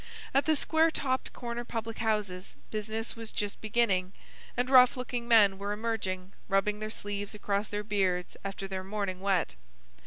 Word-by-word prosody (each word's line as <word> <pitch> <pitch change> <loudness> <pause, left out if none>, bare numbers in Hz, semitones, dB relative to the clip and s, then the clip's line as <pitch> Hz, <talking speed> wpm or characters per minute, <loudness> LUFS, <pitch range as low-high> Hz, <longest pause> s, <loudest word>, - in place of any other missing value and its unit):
At 275 - +4
the 315 - +4
square 320 +3 +3
topped 260 -4 -1
corner 240 -1 -4
public 225 -1 -4
houses 210 -5 -1 0.2
business 220 +1 -3
was 225 -1 -7
just 205 -1 -3
beginning, 205 -4 +1 0.4
and 245 +1 +2
rough 255 -1 +7
looking 245 -1 -3
men 205 -4 +6
were 200 +1 -2
emerging, 200 -4 -3
rubbing 205 +1 +2
their 215 0 -3
sleeves 205 -1 -4
across 205 0 -1
their 210 0 -3
beards 190 -4 0
after 195 0 -4
their 190 -1 -4
morning 195 -2 -3
wet. 190 -3 +1
210 Hz, 160 wpm, -30 LUFS, 195-235 Hz, 0.4 s, rough